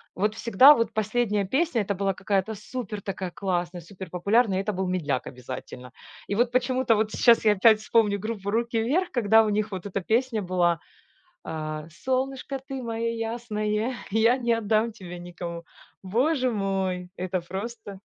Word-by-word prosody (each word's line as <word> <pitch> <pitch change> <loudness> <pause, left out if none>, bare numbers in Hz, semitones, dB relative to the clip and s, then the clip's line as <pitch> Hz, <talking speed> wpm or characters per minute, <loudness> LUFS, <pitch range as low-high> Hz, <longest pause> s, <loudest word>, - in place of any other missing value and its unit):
Вот 210 +3 0
всегда 235 +5 +7
вот 230 -4 -1
последняя 215 -1 0
песня- 265 - +1
это 200 0 -2
была 195 +1 0
какая-то 195 +3 -1
супер 210 0 -6
такая 190 -2 -4
классная, 175 -2 -2
суперпопулярная. 190 +4 0
И - - +1
это 210 +2 -2
был 190 0 -2
медляк 155 -8 -1
обязательно. 125 0 -8 0.3
И 200 - -2
вот 240 +2 +2
почему-то, 255 -1 +2
вот 215 0 0
сейчас 235 -1 +4
я 210 - +6
опять 215 +2 +5
вспомню 215 -2 +2
группу 210 -1 -4
"Руки 230 0 0
Вверх!", 335 +11 0
Когда 225 -2 +4
у - - 0
них 210 +1 -1
вот 190 -1 -5
эта 195 -1 -3
песня 230 +3 0
была, 175 -2 +1 0.7
а: 155 -1 -5
"Солнышко 265 - -2
ты 270 0 -6
моё 230 0 -2
ясное", 225 0 -2 0.2
"я 225 +4 +4
не 240 -2 0
отдам 225 0 +1
тебя 180 -5 -9
никому". 175 -1 -7 0.4
Боже 255 - +1
мой, 190 -4 -2
это 185 0 -2
просто 200 +2 -7
210 Hz, 160 wpm, -26 LUFS, 185-235 Hz, 0.7 s, всегда